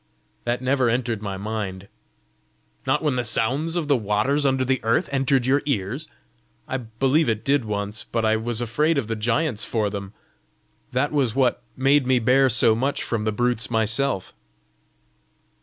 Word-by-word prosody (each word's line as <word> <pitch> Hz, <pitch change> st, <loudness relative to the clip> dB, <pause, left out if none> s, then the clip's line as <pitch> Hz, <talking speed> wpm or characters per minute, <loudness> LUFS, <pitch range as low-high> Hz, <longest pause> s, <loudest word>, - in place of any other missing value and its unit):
"That 120 Hz, +1 st, -1 dB
never 130 Hz, -1 st, +2 dB
entered 120 Hz, -2 st, -1 dB
my 100 Hz, -2 st, -4 dB
mind!" 100 Hz, -2 st, -5 dB, 1.0 s
"Not -, -, +1 dB
when 145 Hz, -5 st, +1 dB
the 125 Hz, -, 0 dB
sounds 130 Hz, +8 st, 0 dB
of 170 Hz, -4 st, -1 dB
the 145 Hz, -, +4 dB
waters 120 Hz, +6 st, +1 dB
under 130 Hz, -1 st, +1 dB
the 130 Hz, 0 st, 0 dB
earth 115 Hz, +10 st, +1 dB
entered 135 Hz, -2 st, +1 dB
your 140 Hz, +3 st, +3 dB
ears?" 125 Hz, +4 st, -2 dB, 0.6 s
"I 130 Hz, -, -2 dB
believe 130 Hz, +5 st, +1 dB
it 110 Hz, -1 st, -1 dB
did 140 Hz, -3 st, +2 dB
once. 105 Hz, 0 st, -3 dB
But 115 Hz, -1 st, -2 dB
I 110 Hz, 0 st, +3 dB
was 115 Hz, +1 st, -2 dB
afraid 150 Hz, +7 st, +1 dB
of 140 Hz, -, 0 dB
the 115 Hz, +1 st, -3 dB
giants 115 Hz, +2 st, 0 dB
for 105 Hz, -3 st, -1 dB
them. 100 Hz, -1 st, -6 dB, 0.8 s
That 130 Hz, +3 st, 0 dB
was 135 Hz, -7 st, 0 dB
what 130 Hz, -3 st, +2 dB, 0.2 s
made 135 Hz, 0 st, +3 dB
me 130 Hz, -1 st, +4 dB
bear 130 Hz, +3 st, +4 dB
so 115 Hz, -1 st, +4 dB
much 135 Hz, +6 st, -1 dB
from 110 Hz, -2 st, -2 dB
the 110 Hz, -, +1 dB
brutes 120 Hz, -1 st, -1 dB
myself!" 110 Hz, 0 st, 0 dB
120 Hz, 170 wpm, -23 LUFS, 110-135 Hz, 1.0 s, the